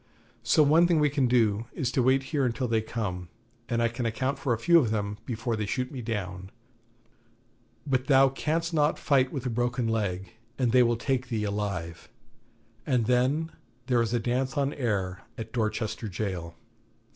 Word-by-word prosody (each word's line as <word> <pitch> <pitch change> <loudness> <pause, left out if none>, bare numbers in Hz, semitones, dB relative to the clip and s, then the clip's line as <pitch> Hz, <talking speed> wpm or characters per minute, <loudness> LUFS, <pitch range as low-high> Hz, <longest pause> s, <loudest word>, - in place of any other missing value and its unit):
So 155 - +4
one 160 +4 +5
thing 170 -3 +3
we 150 -1 +3
can 140 -3 +2
do 115 -3 +2
is 125 -2 -2
to 130 - +1
wait 130 +2 +3
here 145 -2 +2
until 125 +1 0
they 115 -1 +1
come, 90 -6 -4 0.4
and 115 0 +1
I - - +4
can 120 +1 -3
account 130 +5 -2
for 135 - -1
a 115 - +2
few 170 +8 +5
of 125 -8 +1
them 105 -1 -2
before 115 0 -2
they 105 -1 -3
shoot 125 +3 -2
me 130 -4 -6
down; 95 -5 -4 1.4
but 130 -2 0
thou 135 -1 +6
canst 165 +5 -2
not 150 -1 +2
fight 130 -3 +2
with 135 -3 -5
a 125 - -1
broken 120 +1 0
leg, 100 -4 -2 0.3
and 125 -3 +1
they 125 +1 +6
will 120 -1 +3
take 130 +1 -1
thee 115 -4 -2
alive, 100 -5 -4 0.7
and 125 -4 +1
then 130 +7 +1 0.3
there 125 -2 +2
is 115 - -1
a 120 - +1
dance 130 +4 -1
on 140 0 +1
air 100 -9 -2 0.2
at 110 -1 -7
Dorchester 110 -1 -2
Jail.' 90 -4 -4
120 Hz, 185 wpm, -27 LUFS, 110-135 Hz, 1.4 s, thou